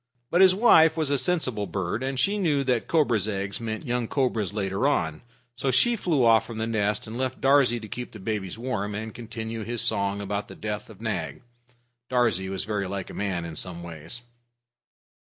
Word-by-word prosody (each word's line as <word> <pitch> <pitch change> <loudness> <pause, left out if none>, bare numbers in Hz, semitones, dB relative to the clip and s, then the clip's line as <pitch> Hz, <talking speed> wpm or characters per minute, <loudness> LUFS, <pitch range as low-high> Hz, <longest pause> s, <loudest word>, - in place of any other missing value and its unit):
But 175 - +4
his 185 -1 +7
wife 165 -7 +6
was 155 -3 0
a 140 - +3
sensible 130 - 0
bird, 95 +3 -2
and 135 0 -2
she 205 +5 +2
knew 150 -7 +2
that 125 -3 0
cobra's 120 - +2
eggs 100 0 -3
meant 110 +3 -4
young 120 -2 -1
cobras 115 -8 0
later 100 +4 0
on. 80 - 0 0.3
So 135 - -1
she 235 - +3
flew 160 - +1
off 115 -1 +6
from 115 - -7
the 110 - -1
nest, 105 -2 0
and 115 +3 -6
left 130 -1 -2
Darzee 135 -3 +4
to 110 - -9
keep 120 +4 -6
the - - -10
babies 100 -1 -3
warm, 110 -4 -3
and 110 0 -5
continue 115 -1 -5
his 120 +1 -2
song 100 0 +1
about 100 0 -3
the - - -10
death 105 0 -5
of 110 -1 -13
Nag. 90 - -3 0.7
Darzee 115 -7 +1
was 95 0 -3
very 105 -2 -2
like 95 -1 -5
a - - -10
man 95 -4 -2
in 80 -1 -7
some 85 -1 -4
ways. 85 +8 -8
110 Hz, 200 wpm, -26 LUFS, 100-130 Hz, 0.7 s, his